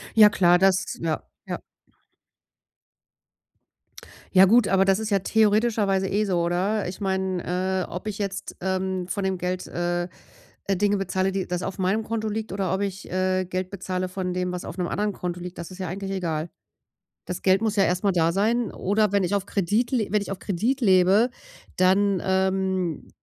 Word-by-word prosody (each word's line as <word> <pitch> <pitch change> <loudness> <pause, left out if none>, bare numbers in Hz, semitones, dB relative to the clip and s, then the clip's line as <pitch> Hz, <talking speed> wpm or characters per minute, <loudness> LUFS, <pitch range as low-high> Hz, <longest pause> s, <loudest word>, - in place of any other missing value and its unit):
Ja 215 -2 +9
klar, 175 -3 +4
das 195 +2 +2
ja, 160 -2 -2 0.2
ja. - - -4 2.7
Ja, 185 0 +8
gut, 230 +3 +5
aber 195 0 +3
das 195 +2 +3
ist 220 - -3
ja 200 -2 +3
theoretischerweise 210 -2 +2
eh 205 +3 +1
so, 185 -4 0
oder? 185 +5 0
Ich 180 +3 -7
meine, 190 -1 -1
äh, - - -13
ob 180 +5 -6
ich 210 -1 -4
jetzt, 200 -1 -4
ähm, 190 -1 -1
von 200 +1 -3
dem 190 -1 -1
Geld, 180 +1 -2
äh, 175 0 -2 0.6
Dinge 200 +1 +2
bezahle, 190 0 0
die 190 -1 -2
das 180 0 -3
auf 195 - -4
meinem 195 +4 0
Konto 220 0 -3
liegt, 215 0 -3
oder 190 -1 -1
ob 190 - -1
ich, 195 0 -4
äh, 185 0 0
Geld 185 0 -3
bezahle 185 -1 -3
von 180 -1 -3
dem, 180 0 -1
was 180 0 -5
auf - - -7
'nem 180 -2 -1
anderen 210 0 -1
Konto 180 -1 -4
liegt, 180 0 -8
das 170 +1 -7
ist 185 - -10
ja 185 -2 -4
eigentlich 195 +2 -5
egal. 165 -4 -2 0.8
Das 180 0 -5
Geld 190 +1 +4
muss 220 -2 0
ja 195 - +4
erstmal 185 +2 +1
da 165 -1 +2
sein 220 +4 +1
oder 205 +1 +1
wenn 200 -1 +3
ich 180 +3 0
auf 200 -1 0
Kredit 205 +6 0
le 230 -5 +1
wenn 210 -1 +2
ich - - -7
auf 195 - -6
Kredit 225 +8 -1
lebe, 195 +1 +5 0.5
dann, 190 +1 +3
ähm, 190 -3 0
190 Hz, 190 wpm, -25 LUFS, 180-205 Hz, 2.7 s, Ja